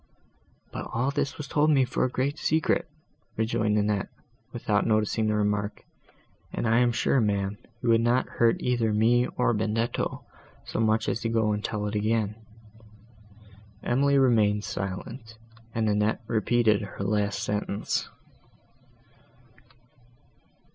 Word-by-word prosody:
"But - - -5
all 130 +5 0
this 140 0 -2
was 150 - -6
told 150 +3 +2
me 135 -4 +4
for 125 - -1
a 130 - +2
great 140 +4 -2
secret," 160 +1 +1 0.5
rejoined 110 -1 +1
Annette, 105 -1 0 0.4
without 105 +1 0
noticing 110 0 +1
the 105 - +1
remark, 105 0 -1 0.7
"and - - -2
I 115 +2 +4
am 120 -1 +3
sure, 120 +3 +2
ma'am, 100 -1 -1 0.2
you 120 - +1
would 115 0 +5
not 120 +2 +2
hurt 115 -1 +2
either 120 -3 +1
me 120 +3 +3
or 125 - +2
Benedetto, 110 +2 -1 0.4
so - - -4
much 110 0 +2
as - - 0
to 115 - -2
go 110 -2 +1
and 105 0 -2
tell 105 -1 -2
it 105 - -3
again." 105 0 0 1.5
Emily 140 +3 +2
remained 110 -6 +3
silent, 110 +5 -6 0.4
and 110 -1 +1
Annette 105 +2 +1
repeated 110 -1 +2
her 100 -1 -6
last 100 0 0
sentence. 105 0 -2
110 Hz, 135 wpm, -27 LUFS, 105-120 Hz, 1.5 s, would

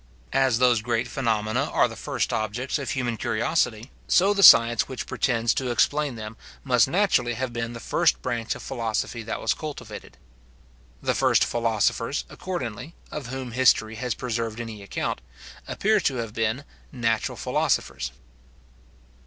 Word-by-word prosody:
As 130 -4 +3
those 120 -3 +4
great 120 +1 -1
phenomena 110 -3 0
are - - +3
the - - -9
first - - -2
objects 115 +7 -2
of 140 - -4
human 120 -3 -2
curiosity, 115 0 -1 0.2
so 195 +3 +4
the 200 - 0
science 115 - +8
which 130 - -5
pretends 115 -3 +1
to 130 -2 -2
explain 145 +3 +1
them 110 0 -8 0.3
must 125 -3 +4
naturally 170 - +2
have 130 0 -3
been 115 0 -3
the 115 - -7
first - - +1
branch 115 -1 -2
of - - -9
philosophy 115 -2 -3
that 115 - -4
was - - +1
cultivated. 125 -9 -8 0.9
The - - +1
first - - +3
philosophers, 115 +2 0
accordingly, 155 - -5 0.2
of 145 -5 -5
whom 130 -1 -5
history 115 -3 +3
has 125 -1 -2
preserved 115 -2 -3
any 115 -3 -6
account, 100 - -3 0.5
appear 215 +1 +2
to 140 -8 0
have 115 -3 -4
been 115 +4 -1 0.3
natural 115 -3 -1
philosophers. - - -1
120 Hz, 150 wpm, -25 LUFS, 115-130 Hz, 0.9 s, science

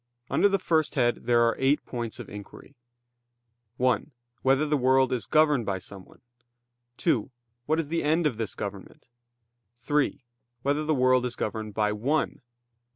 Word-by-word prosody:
Under 205 - +4
the 195 - +2
first 160 -5 0
head 120 -3 +1
there 120 -1 +4
are 115 0 +2
eight 135 +2 +2
points 120 -3 -5
of - - -7
inquiry: 105 +7 -11 1.0
(1) 125 +4 +1 0.3
Whether 135 +3 +3
the 150 0 +1
world 130 0 +3
is 115 -5 -2
governed 150 -5 +3
by 95 -1 0
someone? 95 0 -12 0.8
(2) 130 -11 +1 0.4
What 155 +1 +2
is 155 -3 -3
the 165 +1 0
end 160 +3 +2
of 130 -7 0
this 110 -4 -3
government? 100 -1 -7 0.7
(3) 135 +1 -1 0.4
Whether 145 +2 +1
the 155 0 +1
world 130 -1 +3
is 125 -1 -1
governed 110 -1 -4
by 105 -1 +1
one? 130 +9 -1
130 Hz, 155 wpm, -27 LUFS, 115-150 Hz, 1.0 s, Under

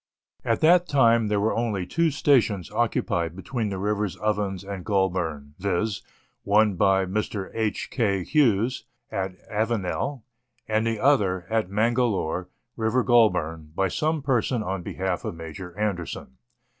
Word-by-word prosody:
At - - 0
that 175 +2 +5
time 115 -5 +4
there 105 -1 +1
were 110 +2 +1
only 110 -6 -1
two 165 - +1
stations 120 - +2
occupied 85 -1 0
between 110 +3 -3
the 95 - -4
rivers 105 -1 -1
Ovens 105 -3 -1
and 100 -2 -6
Goulburn, 90 -8 -1
viz., 100 +2 -1 0.4
one 105 +1 +3
by 95 +1 +3
Mr. 100 0 -3
H. 110 -2 -2
K. 100 -7 0
Hughes, 125 - +2 0.3
at 95 -1 -3
Avenel, 115 +4 -2 0.4
and 110 +1 +1
the 115 -2 -1
other, 100 -10 +2
at 110 -4 +1
Mangalore, 105 -5 0 0.3
River 115 +2 +1
Goulburn, 80 -10 +2
by 95 +1 +1
some 155 - -1
person 125 -3 +1
on 95 -2 -3
behalf 95 +1 -3
of - - -4
Major 85 +3 -8
Anderson. 90 -10 -3
105 Hz, 140 wpm, -25 LUFS, 95-115 Hz, 0.4 s, that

